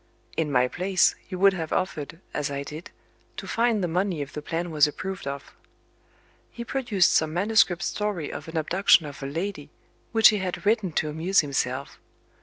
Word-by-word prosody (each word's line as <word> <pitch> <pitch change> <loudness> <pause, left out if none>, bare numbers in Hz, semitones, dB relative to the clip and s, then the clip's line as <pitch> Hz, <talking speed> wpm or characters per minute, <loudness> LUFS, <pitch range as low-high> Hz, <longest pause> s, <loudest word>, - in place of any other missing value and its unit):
In 155 -3 -1
my 125 -1 +3
place, 185 +6 +2 0.2
you 185 - -4
would 195 +1 +5
have 165 -4 -4
offered, 165 -3 -2
as 150 -1 -2
I 140 0 -3
did, 155 +4 -9 0.5
to - - -6
find 230 -3 +1
the - - +1
money 180 -1 -1
if 140 - -12
the 150 - -5
plan 165 +3 -3
was 150 -1 +4
approved 190 +2 -6
of. 140 0 -6 1.0
He 235 - -7
produced 235 -9 +2
some 160 0 +1
manuscript 195 -2 +3
story 205 -7 -2
of - - -7
an 160 0 -5
abduction 175 +1 +4
of 145 -1 -9
a 135 - -4
lady, 165 +1 -4 0.4
which 225 -1 +7
he 215 - +1
had 185 +1 -4
written 210 -4 +2
to 155 - 0
amuse 165 +6 +2
himself. 135 -2 -3
175 Hz, 185 wpm, -25 LUFS, 150-195 Hz, 1.0 s, which